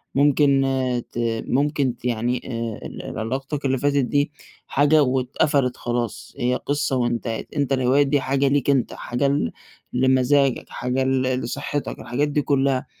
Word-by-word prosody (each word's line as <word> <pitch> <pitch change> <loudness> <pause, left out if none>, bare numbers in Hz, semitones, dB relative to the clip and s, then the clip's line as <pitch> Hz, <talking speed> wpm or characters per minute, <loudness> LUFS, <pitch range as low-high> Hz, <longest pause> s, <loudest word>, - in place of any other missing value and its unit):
ممكن 140 -1 +4 0.5
ت 120 - -5 0.3
ممكن 140 -2 +1
ت - - -15
يعني 120 +1 0
آآ، 115 -3 -4
ال - - -7
علاقتك 135 +5 -3
اللي 135 0 +2
فاتت 140 -1 +1
دي 145 +2 +1 0.4
حاجة 145 +2 +4
واتقَفَلِت 130 +1 +1
خلاص، 120 -1 -3
هي 125 +1 +1
قصة 145 0 -1
وانتهت، 120 -2 -2
أنت 140 -2 +1
الهوايات 135 +2 +3
دي 140 -1 +2
حاجة 135 +1 +1
ليك 140 0 +1
أنت، 135 -3 +2
حاجة 125 +3 -1
ل 140 - 0 0.4
لمزاجك، 130 +1 +2
حاجة 125 +2 -1
ل 130 0 +1 0.2
لصحتك، 140 +4 -4
الحاجات 125 +6 -1
دي 145 0 0
كلها. 135 -2 +1
135 Hz, 150 wpm, -23 LUFS, 125-145 Hz, 0.5 s, ممكن